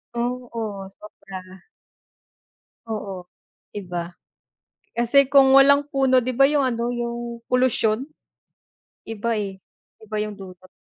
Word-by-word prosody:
Oo, 235 -5 -4
sobra. 190 -3 -12 1.2
Oo, 200 -5 -5 0.5
'di 205 - -4
ba? 175 0 -4 0.8
Kasi 255 +4 +3
kung 270 -1 +6
walang 280 +1 +6
puno, 270 -2 +3
'di 250 0 -1
ba, 275 +2 +5
yung 290 -3 +2
ano, 235 -1 -1
yung 235 -1 -4
polusyon. 250 -2 +2 1.0
Iba 225 +1 -2
eh, 195 -2 -4 0.4
iba 215 0 -6
yung 210 -1 -7
dulot. 185 -1 -12
235 Hz, 110 wpm, -23 LUFS, 200-255 Hz, 1.2 s, kung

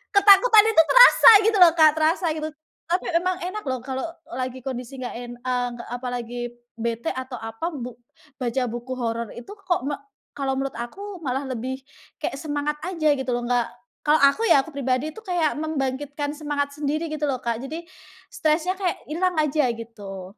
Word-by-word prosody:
ketakutan 415 +2 +7
itu 430 -7 +6
terasa - - +9 0.2
gitu 440 -2 +3
loh, 335 - +8
Kak, 310 -1 +8
terasa 320 +3 +1
gitu. 310 0 -3 0.4
Tapi 360 - +1 0.2
emang 365 +1 -1
enak 405 +4 -4
loh 260 -1 -1
kalau 265 0 -4 0.3
lagi 255 +1 -4
kondisi 255 0 -6
enggak 245 -2 -5
en 240 0 -7
eee, 250 0 -1
nggak 235 - -10
apalagi 245 -1 -5 0.4
bete 235 +6 -2
atau 260 0 -6
apa, 225 +10 -4
bu 245 -3 -6 0.5
baca 250 +1 0
buku 240 +2 -5
horor 230 -1 -2
itu 240 - -10
kok 375 - -2
mek 290 0 -2 0.4
kalau 270 -1 -2
menurut 270 -1 -2
aku, 380 +11 -7
malah 270 -1 -2
lebih 260 +1 -4 0.4
kayak 275 - -3
semangat 295 0 -2
aja 330 -5 +1
gitu 265 -1 -4
loh, 240 0 -2
nggak 245 -1 +2 0.4
kalau 300 0 +4
aku 280 +12 +4
ya, 275 - +6
aku 325 - -11
pribadi 265 +1 -1
itu 445 - -11
kayak 345 -6 0
membangkitkan 290 -1 -3
semangat 290 -2 -2
sendiri 305 +2 -2
gitu 300 -1 -2
loh, 260 -3 -2
Kak. 235 -1 -1
Jadi, 315 +6 -6 0.5
stresnya 315 +3 +1
kayak 365 -3 -2
ilang 360 +2 0
aja, 300 -2 +2
gitu. 205 -5 -9
280 Hz, 175 wpm, -24 LUFS, 245-320 Hz, 0.5 s, terasa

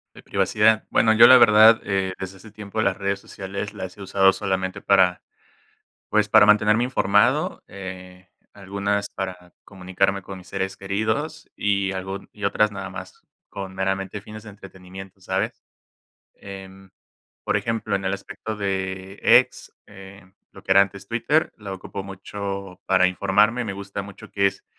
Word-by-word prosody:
De - - -13
privacidad. 110 +1 +2
Bueno, 110 - +4
yo 110 - +8
la 130 - +9
verdad, 110 0 +7
eh, 95 -2 -1
desde 95 0 -7
hace 105 +3 -15
tiempo, 105 0 -7
las 100 -2 +1
redes 100 0 -2
sociales 100 +2 -7
las 95 +2 -8
he - - -11
usado 95 0 +4
solamente 95 -1 -3
para, 95 -3 +3 0.9
pues, 105 0 +2
para 110 0 +7
mantenerme 105 +2 +4
informado, 105 -5 +1
eh, 95 -1 -10 0.2
algunas 100 +1 -3
para 90 -2 -7
comunicarme 95 +1 -1
con 95 0 -9
mis 90 -1 -14
seres 95 0 -3
queridos. 110 +11 -3
Y, 100 -1 0
algún 95 +1 -6
y 105 -1 -8
otras, 105 +1 +2
nada 100 -1 -6
más - - -10 0.3
con, 95 -2 -7
meramente, 95 +1 -2
fines 105 +1 -11
de 110 - -11
entretenimiento, 95 -1 -12
¿sabes?, - - -3 0.7
em, 95 -1 -11 0.5
por - - 0
ejemplo, 110 -3 -1
en 95 - -6
el 95 - 0
aspecto 105 +2 -7
de, 95 -1 -4
X, 120 +2 +3
eh, 100 -1 -13 0.3
lo - - -14
que - - -11
era 100 - +7
antes 100 0 -6
Twitter, 145 +7 +1
la 100 -2 -7
ocupo 95 +1 -8
mucho 100 -1 -7
para 95 -1 +4
informarme. 105 +6 +2
Me 105 - -4
gusta 100 0 -6
mucho 100 -1 -12
que 100 -1 +2
es, 100 0 -3
100 Hz, 160 wpm, -23 LUFS, 95-105 Hz, 0.9 s, la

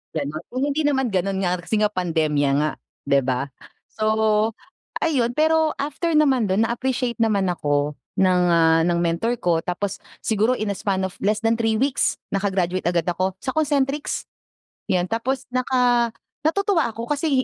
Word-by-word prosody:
Ganun. 150 +1 -3
Kung 255 +2 -4
hindi 290 +2 0
naman 265 -5 +1
ganun 195 +1 0
nga 180 0 0
kasi 195 +5 -1
nga 210 - +2
pandemya 160 -6 0
nga, 155 0 +1 0.3
'di 140 0 +3
ba? 130 +2 -1 0.4
So, 215 0 +1 0.5
ayun. 255 -7 +1
Pero 315 0 +3
after 300 +4 -2
naman 270 -7 +3
dun 195 +4 +2
na-appreciate 245 +1 -1
naman 205 -5 +2
ako 145 -3 -1 0.2
ng, 185 -1 +3
ah, 165 -1 +4
ng 170 -1 +1
mentor 175 +8 0
ko 170 -2 +2
tapos 185 +3 -3 0.2
siguro 220 +3 +2
in 215 -1 -2
a - - -3
span 190 -2 -1
of 190 - -7
less 210 +1 +2
than 225 - +4
3 225 -1 +1
weeks 265 +3 +1 0.2
naka-graduate 190 -3 0
agad 175 -1 +1
ako 185 +2 -1
sa 260 - -1
Concentrix, 290 -2 0 0.6
yun. 180 -3 0
Tapos 255 +4 -2
naka 250 -2 +2 0.3
natutuwa 350 - +1
ako 230 0 -6
kasi 290 -3 +1
215 Hz, 160 wpm, -22 LUFS, 180-260 Hz, 0.6 s, ah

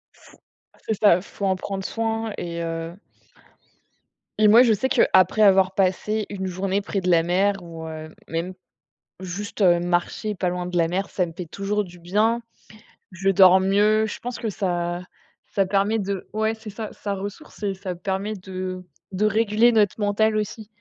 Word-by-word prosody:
Faut - - -19 0.5
c'est 220 - 0
ça, 195 -4 +4
faut 200 +1 -8
en 190 -1 +2
prendre 195 0 -5
soin 225 -1 -2
et 170 -1 -4
heu 165 +1 -4 1.5
et 210 - +7
moi 230 +4 +8
je 235 - +4
sais 220 +5 +1
qu'après 215 -5 +3
avoir 190 -2 +5
passé 200 +3 0
une 190 -2 -4
journée 190 +2 -1
près 195 -1 -3
de 180 - -1
la 165 -1 +4
mer 195 +4 +2
ou 165 -1 -9
heu, 155 0 -8 0.2
même, 170 +3 -3 0.7
juste, 195 +3 -6
heu, 175 -3 +5
marcher 175 +4 -1
pas 185 -1 -1
loin 180 0 -3
de 180 0 -2
la 165 -1 +2
mer, 190 +3 -2
ça 180 -2 0
me 165 - -9
fait 180 - -6
toujours 200 +5 -2
du 175 -1 -13
bien. 215 +7 +1 0.7
Je 190 +1 -1
dors 190 -1 +7
mieux, 210 +3 +3
je 215 - -6
pense 245 0 -5
que 225 - -3
ça 175 -2 -2 0.5
ça 195 -1 +3
permet 200 +3 +1
de 195 -1 -4
ouais, 220 +1 0
c'est 220 -1 -10
ça, 215 +1 -6
ça 200 -1 -4
ressource 205 +5 -8
et 200 -1 0
ça 185 -2 -6
permet 195 +4 -3
de 185 -1 -6 0.3
de 205 +3 +1
réguler 220 +2 +3
notre 215 -1 +2
mental 215 +1 +2
aussi. 215 +1 -3
De - - -24
195 Hz, 185 wpm, -23 LUFS, 180-210 Hz, 1.5 s, moi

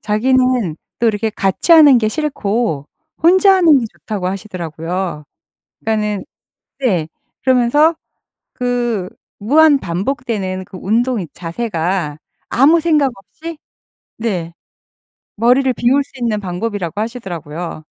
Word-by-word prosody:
자기는 250 -4 +1 0.2
또 235 - +1
이렇게 220 0 +1
"같이 195 - +1
하는 295 -6 +8
게 215 - +1
싫고 220 - -2 0.3
혼자 375 +4 +6
하는 330 -6 +5
게 245 - -2
좋다."고 205 -5 -4
하시더라고요. 180 -3 -4 0.6
그니까는 210 -2 -1 0.6
네. 185 - 0 0.4
그러면서 260 +6 +3 0.6
그 240 -6 -1 0.3
무한 290 +6 +5
반복되는 190 -1 -3
그 190 0 -11
운동 235 +5 +1
이 175 - -5
자세가 170 -4 -3 0.3
아무 295 +7 +5
생각 300 -5 +2
없이 315 - -10 0.6
네. 185 -7 -3 0.8
머리를 250 +4 +3
비울 265 +5 +2
수 - - -27
있는 230 -3 0
방법이라고 195 0 -3
하시더라고요. 175 - -6
220 Hz, 255 characters per minute, -17 LUFS, 185-260 Hz, 0.8 s, 하는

